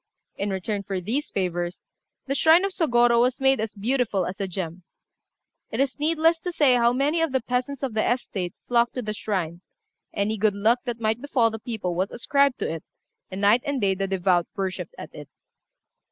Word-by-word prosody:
In 200 - -2
return 200 +2 -2
for 195 -1 -3
these 240 - -2
favours, 175 -2 -3 0.4
the 275 - -1
shrine 320 +6 +5
of 395 - -1
Sôgorô 240 -9 +3
was 250 +1 +1
made 270 0 +3
as 220 0 -3
beautiful 220 -3 0
as 185 +2 -6
a 195 - -1
gem. 180 -1 -5 0.9
It - - -4
is 275 +1 0
needless 325 +2 +2
to 360 - -4
say 290 -6 +4
how 240 -1 +4
many 285 +6 +1
of 325 -3 +1
the 265 - +2
peasants 250 +3 -3
of 260 -4 -2
the 215 +2 +1
estate 195 -7 -3
flocked 235 -1 +2
to 250 - -3
the 215 0 -3
shrine: 180 -6 -3 0.5
any 215 +2 -1
good 210 -1 +2
luck 220 +5 +3
that 240 -2 -3
might 220 +1 0
befall 250 -5 +2
the 220 - -6
people 215 -6 -3
was 185 +4 -1
ascribed 280 +2 +1
to - - 0
it, 165 - -6 0.5
and 190 +1 -6
night 210 +4 +5
and 280 -1 -2
day 195 -3 +2
the 195 +1 -2
devout 180 -2 +1
worshipped 195 - -4
at - - -9
it. - - -10
230 Hz, 200 wpm, -25 LUFS, 195-265 Hz, 0.9 s, shrine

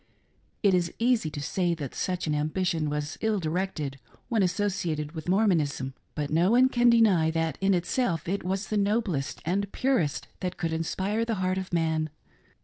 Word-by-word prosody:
It 200 -2 +5
is 175 -2 +1
easy 235 -8 +2
to 150 - -6
say 175 +4 0
that 145 -5 -6
such 180 -1 -2
an 155 - 0
ambition 155 +1 0
was 150 +1 -3
ill 220 -1 +1
directed 160 -5 -2 0.3
when 225 -3 +2
associated 180 -6 -1
with 160 +1 -6
Mormonism, 160 -10 +1 0.2
but 150 -1 -3
no 170 +4 +3
one 250 +3 +5
can 240 -1 +4
deny 210 -9 +5
that, 165 -2 -1
in 195 0 +3
itself, 175 - -1
it 195 +3 -1
was 190 +3 -2
the 215 - 0
noblest 200 - 0
and 200 +4 0
purest 255 - 0
that 180 -1 -3
could 165 -1 -2
inspire 190 +7 -1
the 230 -1 -1
heart 185 0 0
of 190 - -6
man. 160 -2 +1
180 Hz, 175 wpm, -27 LUFS, 155-200 Hz, 0.3 s, It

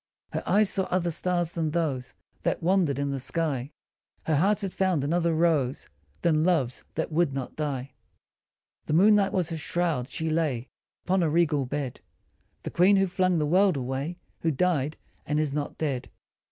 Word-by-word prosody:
Her - - -2
eyes 210 0 +4
saw 190 - 0
other 175 -2 0
stars 175 0 0
than 160 -2 -1
those 140 -6 -2 0.3
That - - -1
wondered 175 -6 +2
in 140 0 -1
the 135 - -2
sky; 140 -1 -2 0.5
Her 160 - +1
heart 200 +7 +2
had 195 -2 -3
found 185 -7 +1
another 170 +3 +1
rose 155 - +1 0.3
Than 155 -2 +3
love's, 155 -9 +1
that 160 - -2
would 155 -3 +1
not 135 -2 -5
die. 140 -3 -3 1.0
The - - -1
moonlight 200 +3 +5
was 175 -3 -1
her 165 - -2
shroud, 160 -5 -1
she 160 - -3
lay 155 -7 -1 0.4
Upon 185 0 +2
a 165 - +2
regal 150 -4 +2
bed 140 -2 -4 0.6
The - - -5
Queen 185 +4 +5
who 195 - +4
flung 185 -1 +1
the 150 - +1
world 185 +1 +3
away, 135 +6 -3 0.2
Who 165 - 0
died 155 -2 0 0.3
and 150 0 +1
is 150 -3 0
not 145 -1 -3
dead. 140 -5 -2
160 Hz, 175 wpm, -27 LUFS, 140-180 Hz, 1.0 s, moonlight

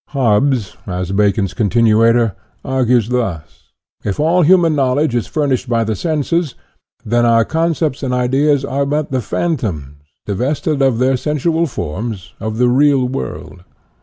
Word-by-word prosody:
" - - -76
Hobbes, 120 -3 +1
as 90 -1 -3
Bacon's 100 -1 +1
continuator, 115 0 +2 0.3
argues 125 -3 +1
thus: 115 -11 -1 0.6
if 100 -2 -3
all 165 +4 +3
human 170 -1 +4
knowledge 135 0 +1
is 120 -2 -1
furnished 135 -4 -1
by 115 -1 +1
the 110 -1 -2
senses, 160 - -1 0.5
then 120 +2 +1
our 115 -1 +4
concepts 160 -3 -1
and 135 -3 -2
ideas 135 +3 +1
are 140 +1 -1
but 150 0 -2
the 130 -1 0
phan 165 +7 -1
toms, 75 - -5 0.3
divested 140 - -1
of 135 -4 +2
their 130 +2 +2
sensual 160 +4 0
forms, 105 - -5
of 110 +1 -4
the 125 +1 +3
real 135 0 +3
world. 90 - -6
125 Hz, 150 wpm, -16 LUFS, 110-145 Hz, 0.6 s, human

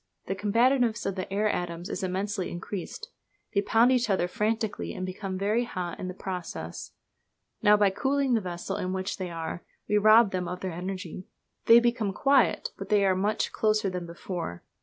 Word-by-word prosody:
The 190 - -2
combativeness 230 +4 +2
of 195 - 0
the 185 0 -5
air 210 +2 +1
atoms 175 -3 -3
is - - -4
immensely 190 +1 -2
increased. 200 - -6 0.4
They 200 - +3
pound 225 +4 +4
each 250 -3 +2
other 185 -3 +2
frantically, 215 +3 -2
and 185 - -3
become 185 0 -4
very 210 +5 +1
hot 180 -7 -5
in 185 - -4
the 185 - -6
process. 180 - -6 0.7
Now, 210 0 +6
by 205 -2 +4
cooling 270 +4 +1
the 225 - +3
vessel 175 -2 -4
in 185 0 -2
which 190 0 -3
they 185 -2 -4
are, 165 0 -5 0.2
we 210 - +3
rob 215 0 +6
them 180 -1 -2
of 180 +1 -5
their 185 -2 -3
energy. 185 0 -6 0.4
They 230 +1 +9
become 235 -4 0
quiet, 275 +4 +3
but - - -6
they 205 -2 +4
are 190 -1 +3
much 205 +3 0
closer 215 -2 +1
than 180 -1 -4
before. 170 - -6
195 Hz, 185 wpm, -28 LUFS, 185-220 Hz, 0.7 s, They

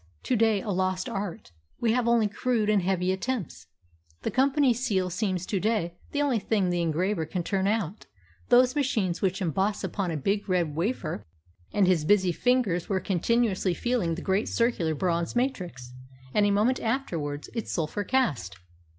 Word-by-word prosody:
to 255 - +1
day 220 -3 +3
a 210 - -2
lost 185 0 0
art. 195 - -5 0.3
We 230 -2 +2
have 245 -1 +1
only 235 -2 +4
crude 220 0 0
and 205 -2 +3
heavy 185 0 +1
attempts. 190 - -3 0.6
The - - -1
company 270 0 +3
seal 200 -7 -1
seems 185 -2 -1
to 195 - -1
day 205 -5 0 0.2
the 290 0 +1
only 265 -6 +1
thing 200 -3 0
the 175 0 0
engraver 170 +3 0
can 175 +2 -3
turn 195 +2 0
out 210 -3 -2 0.4
those 250 +2 +5
machines 220 -11 0
which 190 0 0
emboss 190 +5 0
upon 195 -3 -2
a 160 - -2
big 200 +7 -1
red 170 -5 +1
wafer." 165 - -2 0.4
And 205 - +3
his 180 -4 +3
busy 190 +1 +3
fingers 225 -4 +1
were 195 -2 +1
continuously 195 0 +1
feeling 225 -9 0
the 180 - -7
great 195 +3 0
circular 210 -10 +1
bronze 170 - -1
matrix, 180 - -2 0.4
and 205 -1 +4
a - - +2
moment 215 +6 +2
afterwards 170 - -3
its 230 - -4
sulphur 170 +5 -2
cast. 150 - 0
195 Hz, 170 wpm, -27 LUFS, 175-230 Hz, 0.6 s, those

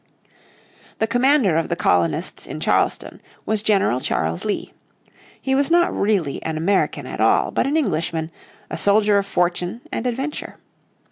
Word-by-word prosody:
The 220 - +1
commander 245 - +3
of 165 - -1
the 170 - 0
colonists 85 - 0
in - - -6
Charleston - - 0 0.2
was 215 -1 0
General 195 - +2
Charles 80 -8 -1
Lee. 205 - -3 0.7
He 265 - -1
was 275 +2 +2
not 345 +1 +3
really 195 -9 0
an 160 -1 -3
American 190 +5 0
at - - -5
all, - - +3
but - - 0
an 295 +3 +1
Englishman, 165 - -1 0.4
a - - -3
soldier 205 0 +4
of 200 - -4
fortune 180 +4 -1
and 250 - -2
adventure. 270 +5 -4
200 Hz, 150 wpm, -21 LUFS, 165-245 Hz, 0.7 s, soldier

